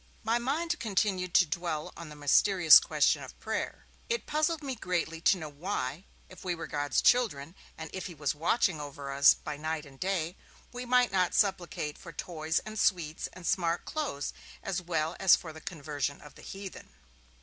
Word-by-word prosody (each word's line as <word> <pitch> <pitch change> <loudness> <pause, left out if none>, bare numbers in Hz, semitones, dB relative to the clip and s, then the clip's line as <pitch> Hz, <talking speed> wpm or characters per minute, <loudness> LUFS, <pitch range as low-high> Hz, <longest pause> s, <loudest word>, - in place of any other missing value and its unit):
My 230 +2 +2
mind 330 +8 -1
continued 190 -4 0
to 185 - +7
dwell 155 -1 -3
on 165 -2 -9
the 150 - -10
mysterious 160 +4 +7
question - - +2
of - - -11
prayer. - - -4 0.2
It 470 0 -1
puzzled 310 +1 0
me 270 -2 -3
greatly 170 -7 -2
to 190 - +4
know 160 -3 -6
why, 150 +1 -4 0.2
if 185 - -13
we 180 -2 -1
were 165 - -6
God's 145 -2 0
children, 175 - +2 0.2
and 160 - -6
if 190 - -4
he 175 - -9
was 145 -2 -1
watching 165 +1 +1
over 140 -1 -7
us 140 +1 +6
by 150 -1 -6
night 155 0 -3
and 135 -1 -15
day, 180 -2 -1 0.3
we 250 0 -6
might 250 0 +4
not 185 -2 +1
supplicate 175 -6 0
for 170 - -10
toys 160 0 -3
and 215 0 -6
sweets 165 -5 +1
and 180 - -11
smart 170 -2 0
clothes 280 - -3 0.3
as 190 -1 -2
well 165 -2 -1
as 190 - +7
for 160 -2 -8
the 160 - -11
conversion 145 -3 -4
of 150 - -13
the - - -15
heathen. 195 -1 -9
175 Hz, 185 wpm, -30 LUFS, 150-195 Hz, 0.3 s, to